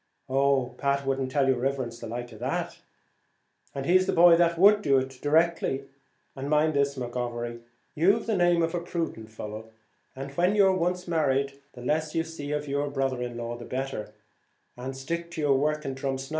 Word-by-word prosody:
"Oh, 135 -2 +2
Pat 140 -1 0
would 135 0 0
not 130 -1 -2
tell 135 0 +2
your 130 -1 +3
riverence 130 -3 -2
the 115 - -7
like 120 +2 -5
of 110 - -12
that." - - -3 1.0
"And 135 -1 -3
he's 185 +4 +4
the - - +1
boy 170 0 +7
that 170 0 +3
would 205 +3 +6
do 140 -8 +3
it, 130 0 -3
directly. 155 -2 +2 0.5
And 135 +1 -5
mind 155 +1 +3
this, 140 -1 +1
McGovery, 120 -1 -4 0.3
you've 195 +8 +3
the 220 - 0
name 175 -2 +3
of 165 +1 -1
a 175 - 0
prudent 165 -10 -4
fellow 110 0 -8 0.7
when 180 +5 +2
you're 195 -2 +5
once 180 0 -1
married, 140 -4 0
the 125 - -11
less 155 +3 -1
you 165 - +2
see 160 -3 -7
of 150 0 -2
your 140 +1 -1
brother 135 -2 -1
in 120 -1 -4
law 120 0 -4
the 120 - -9
better, 130 -5 -4 0.6
and 130 +2 -6
stick 170 +5 -4
to 160 - -4
your 140 -3 +3
work 150 +1 0
in 135 - -2
Drumsna." 135 0 -3
140 Hz, 195 wpm, -27 LUFS, 130-165 Hz, 1.0 s, boy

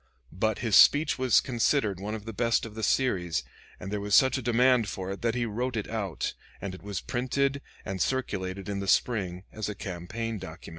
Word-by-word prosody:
But 110 +4 0
his 110 - +3
speech 145 -1 +6
was 130 -2 +5
considered 120 -5 +1
the 105 +2 -5
best 115 +2 +1
of 115 - -9
the 110 - -6
series, 95 - +1 0.4
and 95 - -7
there 105 -1 -2
was 100 -1 +2
such 130 -1 +5
a 130 - -1
demand 120 -1 +3
for 95 +1 -4
it 100 - -6
that 115 0 0
he 120 -1 0
wrote 120 +2 -2
it 105 - -3
out, 100 -6 -3 0.3
and 100 -2 -5
it 95 - -10
was 100 -2 -4
printed 135 +3 -1 0.2
and 95 -1 -3
circulated 100 -7 -2
in 100 -1 -2
the 100 - -4
spring 95 -6 +1
as 110 -1 -4
a 105 - -4
campaign 105 +4 -5
document. 85 -1 -9
110 Hz, 200 wpm, -28 LUFS, 95-120 Hz, 0.4 s, speech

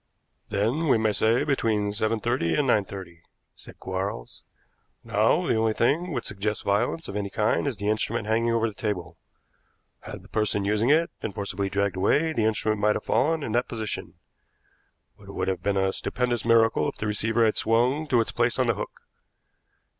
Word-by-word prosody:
"Then 115 +11 0
we 130 - +4
may 110 -1 +1
say 110 +4 +2
between 110 -7 0
seven 110 +2 0
thirty 120 -7 0
and 145 - +1
nine 110 -6 +3
thirty," 90 -4 -9 0.3
said - - -14
Quarles. 95 -9 -5 0.6
"Now - - +2
the - - +2
only 110 0 +1
thing 160 +11 +1
which 120 -5 -3
suggests 105 +1 -3
violence 105 +11 0
of 100 - -6
any 100 -1 -2
kind 105 +7 0
is 130 -6 -2
the 100 - -4
instrument 110 +1 0
hanging 115 +2 +1
over 115 0 +2
the 110 - -6
table. 90 -6 -4 0.8
Had - - -9
the - - -16
person 105 -2 0
using 105 +4 +1
it 160 +3 +3
been 100 - -5
forcibly 100 0 -3
dragged 100 -1 -1
away, 150 +12 +2
the 115 -7 +1
instrument 110 -1 0
might 105 0 +3
have - - -3
fallen 160 +1 +1
in 115 - -3
that 120 +2 +1
position, 110 -3 -5 1.0
but - - -16
it - - -9
would - - -2
have 95 -1 -1
been 100 -1 0
a 95 0 +1
stupendous 125 -2 -1
miracle 115 -1 +3
if - - -9
the - - -4
receiver 115 +2 +1
had 110 - +2
swung 125 +7 +1
to 120 -4 +3
its 115 - -2
place 120 0 +1
on 130 - +2
the 120 - +2
hook. 105 - -7
110 Hz, 195 wpm, -26 LUFS, 100-120 Hz, 1.0 s, we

